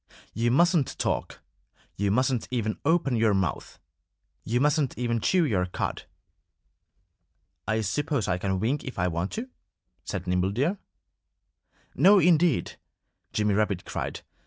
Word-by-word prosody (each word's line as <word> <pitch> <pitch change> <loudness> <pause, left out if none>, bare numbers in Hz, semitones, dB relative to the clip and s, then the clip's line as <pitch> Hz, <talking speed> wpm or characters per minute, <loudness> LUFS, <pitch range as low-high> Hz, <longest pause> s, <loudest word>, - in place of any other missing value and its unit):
"You 115 +1 0
mustn't 170 +2 +2
talk. - - -2 0.5
You 100 0 0
mustn't 125 +3 +1
even 115 -4 -2
open 160 -4 +2
your 110 -3 +3
mouth. 95 -7 -2 0.7
You 120 +3 0
mustn't 145 -1 +1
even 115 -2 -1
chew 180 -3 +3
your 95 -9 0
cud." 90 - -4 1.6
"I 110 +1 +1
suppose 135 +3 -1
I 90 -1 0
can 95 0 -1
wink 130 +8 -1
if 130 - -7
I 90 0 +1
want 85 +2 -2
to," 230 +4 -4 0.6
said 90 - -5
Nimble 90 +1 0
Deer. 155 - 0 1.1
"No, 205 +2 +6
indeed!" 170 - +3 0.5
Jimmy 105 -1 +1
Rabbit 100 -3 0
cried. - - -4
115 Hz, 135 wpm, -26 LUFS, 100-150 Hz, 1.6 s, No